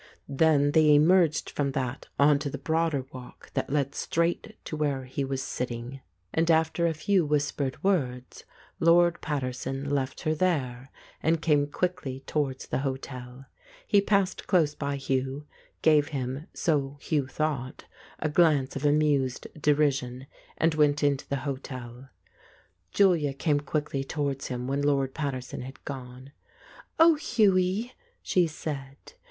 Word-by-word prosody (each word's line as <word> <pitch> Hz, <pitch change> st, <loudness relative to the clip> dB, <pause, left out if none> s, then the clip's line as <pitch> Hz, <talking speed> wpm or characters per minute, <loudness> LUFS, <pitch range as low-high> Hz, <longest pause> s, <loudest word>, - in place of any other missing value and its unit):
Then 145 Hz, 0 st, +3 dB
they 155 Hz, -1 st, +5 dB
emerged 165 Hz, +1 st, +4 dB
from 140 Hz, -2 st, -1 dB
that 130 Hz, 0 st, -3 dB
on 145 Hz, 0 st, +5 dB
to 145 Hz, -, -3 dB
the -, -, -5 dB
broader 160 Hz, -4 st, 0 dB
walk 125 Hz, -1 st, -11 dB
that -, -, -2 dB
led 140 Hz, -1 st, 0 dB
straight 175 Hz, +6 st, -1 dB
to -, -, -4 dB
where 140 Hz, -4 st, -1 dB
he 135 Hz, +2 st, -3 dB
was 135 Hz, 0 st, -3 dB
sitting, 125 Hz, +1 st, -5 dB, 0.3 s
and 165 Hz, +1 st, +1 dB
after 160 Hz, +1 st, +3 dB
a 165 Hz, -, 0 dB
few 180 Hz, +4 st, +2 dB
whis 145 Hz, -1 st, +1 dB
N -, -, -23 dB
20I -, -, -32 dB
The 140 Hz, -, 0 dB
Ape 130 Hz, -, -1 dB
pered -, -, -21 dB
words, 130 Hz, -10 st, -1 dB, 0.4 s
Lord 170 Hz, +1 st, +4 dB
Paterson 135 Hz, -1 st, -3 dB
left 140 Hz, -1 st, -2 dB
her 155 Hz, -, 0 dB
there, 135 Hz, -7 st, -1 dB, 0.3 s
and 160 Hz, +1 st, +2 dB
came 150 Hz, -3 st, +2 dB
quickly 145 Hz, -5 st, -3 dB
towards 135 Hz, -3 st, -2 dB
the -, -, -2 dB
hotel. 130 Hz, -1 st, -5 dB, 0.4 s
He 205 Hz, -2 st, +4 dB
passed 200 Hz, -2 st, 0 dB
close 165 Hz, -6 st, +3 dB
by 140 Hz, -1 st, -3 dB
Hugh, 135 Hz, +1 st, -2 dB, 0.4 s
gave 150 Hz, -2 st, +5 dB
him 135 Hz, +1 st, -4 dB
(so 145 Hz, -3 st, -1 dB
Hugh 145 Hz, -2 st, -1 dB
thought) 135 Hz, -3 st, -3 dB, 0.3 s
a 155 Hz, -, -1 dB
glance 150 Hz, -4 st, +3 dB
of 140 Hz, -, -4 dB
amused 145 Hz, -3 st, +2 dB
deri 150 Hz, -1 st, +3 dB
sion, 130 Hz, -1 st, -6 dB, 0.3 s
and 165 Hz, 0 st, +2 dB
went 150 Hz, -1 st, +2 dB
into 140 Hz, -2 st, +1 dB
the 140 Hz, -, 0 dB
hotel. 130 Hz, -2 st, -6 dB, 0.8 s
Julia 170 Hz, -8 st, +3 dB
came 145 Hz, 0 st, +1 dB
quickly 145 Hz, -1 st, -2 dB
towards 140 Hz, -1 st, -3 dB
him 125 Hz, -1 st, -4 dB
when 140 Hz, +1 st, -1 dB
Lord 140 Hz, -2 st, +1 dB
Pater 140 Hz, -4 st, -2 dB
son 125 Hz, -, -7 dB
had 130 Hz, +2 st, -10 dB
gone, 130 Hz, -1 st, -8 dB, 0.7 s
"Oh, 330 Hz, +1 st, +8 dB
Hughie," 215 Hz, -4 st, +1 dB, 0.3 s
she 180 Hz, -2 st, +2 dB
said. 140 Hz, -3 st, -7 dB
145 Hz, 155 wpm, -27 LUFS, 135-160 Hz, 0.8 s, Oh